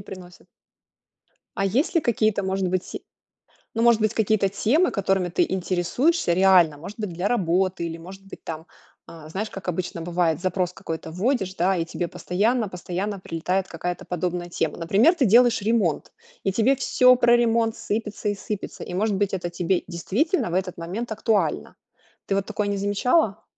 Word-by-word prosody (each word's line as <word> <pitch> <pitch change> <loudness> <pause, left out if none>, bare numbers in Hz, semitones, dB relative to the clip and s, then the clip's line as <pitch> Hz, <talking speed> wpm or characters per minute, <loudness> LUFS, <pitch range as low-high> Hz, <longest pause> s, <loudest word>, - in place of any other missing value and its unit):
приносит. 185 -2 -11 1.1
А 195 - 0
есть 245 - +1
ли 335 - +4
какие-то, 215 -5 +1
может 190 0 -1
быть 185 0 -3 0.7
ну, 230 - 0
может 235 -1 +5
быть, 215 0 +2
какие-то 215 -2 +2
темы, 235 - +2
которыми 190 -2 0
ты 175 - +2
интересуешься 185 - +1
реально? 180 -4 +5
Может 190 +9 -9
быть, 210 -5 -4
для 180 +4 -1
работы 185 -4 +1
или, 165 0 -5
может 190 +4 -11
быть, 195 - -12
там, 160 0 -7 0.4
а, 160 -2 -12
знаешь, 200 +7 -4
как 195 -1 -9
обычно 180 -1 -3
бывает, 170 -2 0
запрос 180 -1 -1
какой-то 160 -2 -6
вводишь, 195 0 -1
да 185 +2 +1
и 165 - 0
тебе 170 +1 -4
постоянно 215 +7 0
постоянно 185 +2 -4
прилетает 180 +3 -2
какая-то 175 +2 -4
подобная 175 0 -3
тема? 165 -2 -2
Например, 200 - +4
ты 290 -7 +2
делаешь 235 +2 +5
ремонт, 205 -7 0 0.3
и 195 - +2
тебе 225 +7 +3
всё 255 -1 +5
про 240 -1 +4
ремонт 230 -1 +1
сыпется 210 0 -3
и - - -1
сыпется. 205 +1 -6
И, 180 - -7
может 210 +3 +1
быть, 200 0 0
это 175 -2 -3
тебе 175 +1 0
действительно 195 - -1
в - - -3
этот 185 -1 -1
момент 205 +8 -4
актуально. 205 - 0 0.5
Ты 195 - 0
вот 195 0 -1
такое 210 -1 -2
не 200 - -1
замечала? 205 - +1
195 Hz, 175 wpm, -24 LUFS, 175-220 Hz, 1.1 s, может